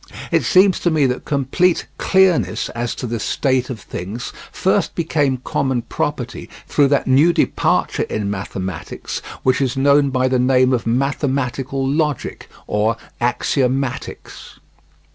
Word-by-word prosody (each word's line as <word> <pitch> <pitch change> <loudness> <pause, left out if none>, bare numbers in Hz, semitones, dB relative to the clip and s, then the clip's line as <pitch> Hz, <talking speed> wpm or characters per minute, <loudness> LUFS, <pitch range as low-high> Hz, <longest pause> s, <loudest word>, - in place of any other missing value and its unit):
It - - +3
seems 190 0 +4
to 175 - +1
me 155 -4 +2
that 125 -1 -2
complete 150 +6 +1
clearness 190 -3 +2
as 120 0 -3
to - - -5
this 115 -2 -3
state 130 -1 0
of 120 -4 -5
things 100 +5 -6 0.2
first - - 0
became 145 -5 +1
common 130 -3 -1
property 125 -1 -4 0.2
through 145 -2 +3
that 140 0 +1
new 140 +6 +5
departure 170 - +1
in 105 -1 -2
mathematics 95 -3 -5 0.2
which 130 +1 +2
is 135 -1 0
known 140 +1 +4
by 130 -1 +1
the 130 -1 +1
name 130 0 +3
of 120 -2 -1
mathematical 135 +1 -1
logic 150 -1 -2 0.2
or 110 +2 0 0.2
"Axiomatics." 130 +1 -2
130 Hz, 135 wpm, -19 LUFS, 120-145 Hz, 0.2 s, new